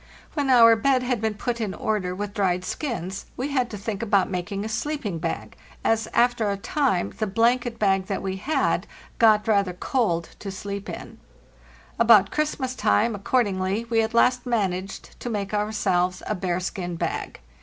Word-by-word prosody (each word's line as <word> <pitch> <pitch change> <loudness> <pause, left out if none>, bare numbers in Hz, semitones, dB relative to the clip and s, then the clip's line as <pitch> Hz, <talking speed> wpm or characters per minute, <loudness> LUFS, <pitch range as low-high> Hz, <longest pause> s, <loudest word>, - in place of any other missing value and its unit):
When 285 -3 -1
our 230 -3 +8
bed 255 +3 +2
had 245 -3 -1
been 220 -1 -1
put 235 +2 -3
in 205 -3 -2
order 195 -4 -1
with 205 +1 -4
dried 185 -4 0
skins 195 - -4
we 265 +3 -2
had 255 -4 0
to 210 - -6
think 205 +1 -4
about 200 -4 +2
making 195 +3 -3
a - - -2
sleep 260 +6 -3
ing 180 -5 -2
bag, - - -4 0.3
as, 225 -1 +1
after 240 -3 +2
a 200 - -1
time, 225 -3 0
the 215 - 0
blanket 235 +3 +1
bag 195 -3 +2
that 195 - -3
we 190 0 -2
had 280 +11 0 0.3
got 215 -2 +5
rather 200 -4 +2
cold 180 -4 -1
to 200 - -6
sleep 200 +1 -6
in, - - -8 0.8
About 220 -4 +6
Christmas 295 -4 -1
time, 160 - +2
accord 230 +5 +1
ingly, 195 +3 -2
we 225 -1 +4
at 220 +1 -2
last 250 +1 +3
managed 195 -5 -2
to 245 - -5
make 205 -2 -3
ourselves 185 -4 0
a - - -1
bearskin 180 -1 -3
bag. - - -3
210 Hz, 175 wpm, -24 LUFS, 190-235 Hz, 0.8 s, our